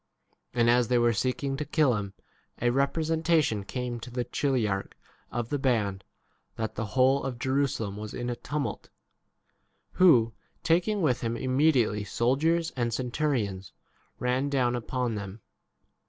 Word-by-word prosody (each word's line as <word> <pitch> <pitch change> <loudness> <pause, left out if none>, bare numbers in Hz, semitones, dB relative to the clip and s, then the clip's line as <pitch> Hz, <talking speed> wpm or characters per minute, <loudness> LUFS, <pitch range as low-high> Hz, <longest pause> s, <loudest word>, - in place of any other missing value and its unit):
And 120 -1 +3
as 120 0 +4
they 125 - +2
were 120 0 +3
seeking 130 +5 -1
to 150 - -2
kill 150 -2 +2
him, 100 -2 -5 0.4
a 120 0 +2
representation 155 -3 +1
came 125 +2 -4
to 120 - -9
the 125 0 -2
chili 130 -4 0
arch 95 -1 -3 0.4
of 120 -1 -3
the 145 - -1
band 105 -8 0 0.5
that 110 -1 -3
the 115 - -3
whole 130 +2 +5
32 - - -3
of 125 -2 -5
Jerusalem 130 -6 -1
was 105 0 -6
in 120 - -4
a 120 - -2
tumult; 125 -1 -4 1.0
who, 120 -11 +5 0.3
taking 180 +4 +2
with 125 -5 +2
him 115 0 -2
immediately 130 -5 +2
soldiers 155 - +1
and 120 -2 0
centurions, 120 - -2 0.4
ran 125 +3 0
down 125 -3 +1
upon 125 0 -2
them. 100 0 -6
125 Hz, 150 wpm, -28 LUFS, 115-140 Hz, 1.0 s, whole